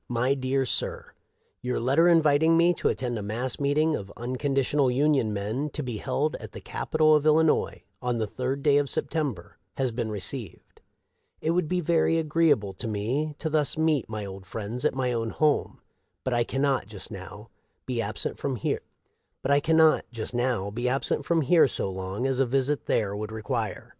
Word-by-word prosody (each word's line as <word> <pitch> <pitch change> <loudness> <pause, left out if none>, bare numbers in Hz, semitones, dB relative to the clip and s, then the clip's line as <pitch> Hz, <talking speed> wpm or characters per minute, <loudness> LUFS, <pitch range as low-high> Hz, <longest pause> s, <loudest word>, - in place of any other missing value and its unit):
" - - -48
My 130 +3 +3
Dear 135 0 0
Sir: - - -3 0.2
" - - -44 0.2
Your 125 0 -1
letter 140 +8 +3
inviting 160 0 +4
me 170 +1 +5
to - - 0
attend 120 -3 -2
i - - -4
mass 115 +5 -3
meeting 150 +3 +2
of 100 -1 -6
Unconditional 135 +2 0
Union 135 -3 +2
men, 110 +9 -2
to 150 - -3
be 120 -4 -4
held 140 +6 -1
at - - -10
the - - -7
Cap - - -7
itol 155 -1 +5
of 150 0 +2
Illinois, 155 +1 +2 0.2
on 125 -1 -1
the 110 - 0
3d 130 +5 -3
day 145 -2 +5
of 140 -1 -1
September, 140 - -2 0.2
has 130 -2 0
been 115 -1 -3
received. 105 - -7 0.2
" - - -47
It 160 - 0
would 170 -2 +1
be 180 +2 0
very 165 0 +2
agreeable 155 -10 +2
to 115 - -4
me 125 +9 -2
to - - -3
thus 155 -2 +1
meet 155 -7 +1
my 110 -2 -4
old 95 -1 -9
friends 115 +3 -5
at - - +2
my 130 -2 0
own 115 -1 -1
home; 150 +4 0 0.4
but 130 - -1
I 120 -1 +2
can 135 +3 -2
not, 135 -8 +1
just 105 +1 -6
now, 105 +2 -9 0.3
be 125 -3 -1
absent 105 -1 -3
from, 140 -2 -2
here 110 - -2 2.9
so 95 - -3
long 95 +5 -4
as 135 -1 0
a 135 - +4
visit 135 +3 0
there 100 -2 +1
would 105 +1 -5
require. 110 -1 -3
130 Hz, 180 wpm, -26 LUFS, 110-150 Hz, 2.9 s, me